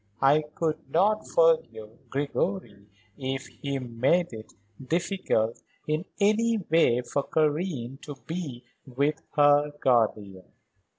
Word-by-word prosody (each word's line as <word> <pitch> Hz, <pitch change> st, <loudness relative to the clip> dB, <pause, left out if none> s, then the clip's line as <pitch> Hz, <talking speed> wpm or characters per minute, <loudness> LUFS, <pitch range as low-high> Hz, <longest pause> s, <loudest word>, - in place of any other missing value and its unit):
I 145 Hz, +3 st, +5 dB
could 160 Hz, -2 st, -1 dB
not 200 Hz, +8 st, +2 dB
forgive 480 Hz, -, +1 dB
Gregory 140 Hz, -, -3 dB, 0.3 s
if 135 Hz, 0 st, -3 dB
he 140 Hz, -1 st, -5 dB
made 130 Hz, +7 st, 0 dB
it 110 Hz, -1 st, -9 dB, 0.3 s
difficult 165 Hz, -, -1 dB, 0.3 s
in 155 Hz, +4 st, -1 dB
any 220 Hz, +3 st, +3 dB
way 165 Hz, -, +2 dB
for 140 Hz, +3 st, -2 dB
Karen 150 Hz, -4 st, -1 dB
to 145 Hz, -, -8 dB
be 160 Hz, -8 st, -5 dB, 0.2 s
with 140 Hz, +4 st, -1 dB
her 145 Hz, 0 st, +5 dB
guardian." 105 Hz, -7 st, 0 dB
145 Hz, 110 wpm, -27 LUFS, 125-175 Hz, 0.3 s, I